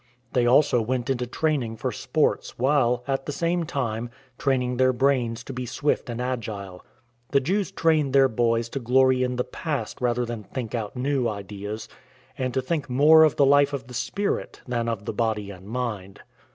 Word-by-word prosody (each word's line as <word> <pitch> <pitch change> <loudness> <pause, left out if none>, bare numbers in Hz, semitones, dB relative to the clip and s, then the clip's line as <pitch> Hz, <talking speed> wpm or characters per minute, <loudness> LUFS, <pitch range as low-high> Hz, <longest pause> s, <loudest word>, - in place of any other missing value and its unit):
They 120 -1 +3
also 125 -1 +4
went 125 +3 -1
into 125 -2 -1
training 130 -5 -1
for - - -2
sports, - - -1
while, 125 -2 +2
at 135 0 -2
the - - -1
same 170 +3 0
time, 120 -6 -3 0.3
training 125 -2 0
their 130 0 +4
brains 120 -3 +1
to 135 - -7
be 125 0 -4
swift 145 +1 -1
and 120 0 -4
agile. 105 -7 -4 0.5
The 140 - +4
Jews 190 +9 0
trained 155 -4 +2
their 135 0 +6
boys 115 -1 +1
to 135 - -4
glory 130 +1 +3
in 125 0 0
the 125 - 0
past 145 -11 -4
rather 120 0 +1
than 115 -2 -5
think 115 -1 -5
out 110 -2 -3
new 130 -1 0
ideas, 105 +1 -6 0.5
and 130 -1 -2
to 130 - +1
think 150 0 -2
more 150 +5 +7
of 155 - +3
the 140 - +4
life 145 +1 +4
of 135 -5 -4
the 125 - -12
spirit 200 - -2
than 120 -2 -1
of 110 -3 -4
the - - -3
body 105 -2 -1
and 95 0 -12
mind. 110 -5 -4
125 Hz, 190 wpm, -25 LUFS, 115-140 Hz, 0.5 s, more